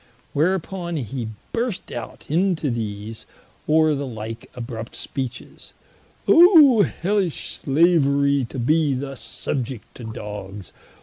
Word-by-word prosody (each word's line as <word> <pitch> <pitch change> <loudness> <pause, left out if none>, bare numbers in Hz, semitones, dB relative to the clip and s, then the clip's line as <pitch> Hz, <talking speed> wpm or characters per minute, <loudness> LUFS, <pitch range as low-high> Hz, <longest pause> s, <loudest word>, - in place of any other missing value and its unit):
Whereupon 175 +2 -1
hee 125 -3 -3 0.3
burst 230 -4 -2
out - - -7
into 165 -3 +1
these, 110 -1 -5 0.4
or 155 0 +4
the 140 -1 -3
like 115 -1 -7
abrupt 115 -2 -6
speeches: 130 -3 -7 0.5
"Oh 320 - +8
Hellish 190 0 -1
slaverie 140 -3 +3
to - - -7
be 150 +3 +2
thus 135 0 -5
subiect 125 -4 -4
to 125 - -11
Dogs! 105 -3 -7
140 Hz, 110 wpm, -22 LUFS, 115-170 Hz, 0.5 s, Oh